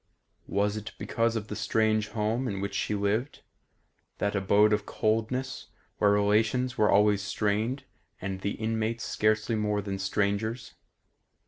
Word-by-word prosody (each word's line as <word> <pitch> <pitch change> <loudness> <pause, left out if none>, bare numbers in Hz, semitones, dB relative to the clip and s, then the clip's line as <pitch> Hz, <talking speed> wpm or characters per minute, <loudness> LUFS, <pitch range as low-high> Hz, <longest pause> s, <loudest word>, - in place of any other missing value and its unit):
Was 100 +1 0
it 105 0 -7
because 115 0 0
of 110 -1 -3
the 105 - -5
strange 110 0 +1
home 110 +4 -1
in 100 -4 -3
which 100 0 -3
she 105 +1 -1
lived; 105 +7 -1 0.7
that 100 0 -1
abode 100 +2 +4
of 105 -1 -1
coldness 115 +5 -1 0.3
where 105 - +4
relations 105 +5 +2
were 105 - +3
always 105 0 +4
strained 105 +6 -1 0.4
and 95 0 -4
the 100 - -1
inmates 110 +1 -2
scarcely 110 +2 +1
more 105 -1 0
than 100 -1 -4
strangers? 105 +4 -1
105 Hz, 140 wpm, -28 LUFS, 100-110 Hz, 0.7 s, abode